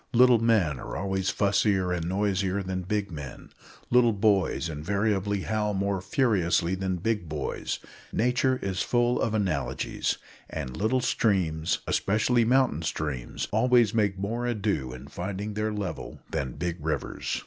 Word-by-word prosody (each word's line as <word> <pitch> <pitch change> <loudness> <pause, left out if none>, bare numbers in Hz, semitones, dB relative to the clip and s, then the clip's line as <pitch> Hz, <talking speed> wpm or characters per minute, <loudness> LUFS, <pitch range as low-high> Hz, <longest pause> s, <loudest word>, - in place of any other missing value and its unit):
Little 125 -1 +6
men 105 - +2
are - - -5
always 95 -1 -1
fussier 100 -2 +2
and 85 -1 -3
noisier 95 0 0
than 95 0 -3
big 100 +1 -2
men; 75 -4 -8 0.4
little 120 -2 +5
boys 100 -4 +2
invariably 100 +5 0
howl 105 0 -1
more 100 -1 0
furiously 95 -5 +1
than 95 0 -1
big 95 -2 -1
boys. 75 -3 -3 0.3
Nature 125 +2 +2
is 95 -2 -1
full 120 0 +2
of 110 -1 0
analogies; 90 -10 -1 0.3
and 65 0 -5
little 120 +5 +1
streams, 90 -10 +1
especially 110 +4 +2
mountain 125 - +3
streams, 75 -6 -3
always 120 0 +4
make 105 -4 +1
more 115 +5 -2
ado 100 - -1
in 65 +2 -9
finding 100 +6 -4
their 105 +1 -1
level 105 -4 -5
than 65 -3 -2
big 85 0 -4
rivers. 80 -1 -2
100 Hz, 140 wpm, -27 LUFS, 90-110 Hz, 0.4 s, Little